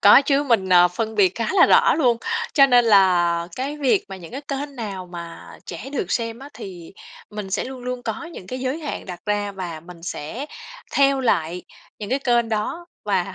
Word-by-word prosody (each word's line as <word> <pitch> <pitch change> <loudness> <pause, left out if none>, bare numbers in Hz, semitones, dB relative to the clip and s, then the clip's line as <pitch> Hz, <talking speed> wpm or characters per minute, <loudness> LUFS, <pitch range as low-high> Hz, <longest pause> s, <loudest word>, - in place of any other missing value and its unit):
Có 205 +7 +8
chứ 280 0 +2
mình, 225 -8 +2
ờ, 180 -1 +7
phân 220 +5 -3
biệt 190 -3 +3
khá 230 - -2
là 375 - +7
rõ 475 +1 +5
luôn, 245 -7 +3 0.4
cho 275 -3 +7
nên 245 -2 +5
là 175 -5 +4
cái 275 +3 -3
việc 255 -8 +2
mà 195 - -7
những 170 -3 -11
cái 270 - -5
kênh 280 0 -4
nào 200 -6 -5
mà 170 -1 -8 0.2
trẻ 185 +10 -7
được 195 -10 -2
xem 230 -1 -2
á 275 +2 -10
thì 175 -4 -9 0.4
mình 210 -2 -6
sẽ 200 - -1
luôn 260 -1 -8
luôn 250 0 -4
có 335 - -4
những 335 - -10
cái 255 +6 -5
giới 260 +4 -2
hạn 305 -3 -5
đặt 180 -2 -7
ra 205 -1 -1
và 175 -5 -6
mình 170 +1 -13
sẽ 180 - -5 0.5
theo 275 -1 +3
lại 175 -8 0 0.4
những 210 0 -6
cái 265 - +2
kênh 240 -4 +2
đó. 225 +11 -2 0.2
Và 195 -2 0
220 Hz, 210 wpm, -22 LUFS, 185-265 Hz, 0.5 s, Có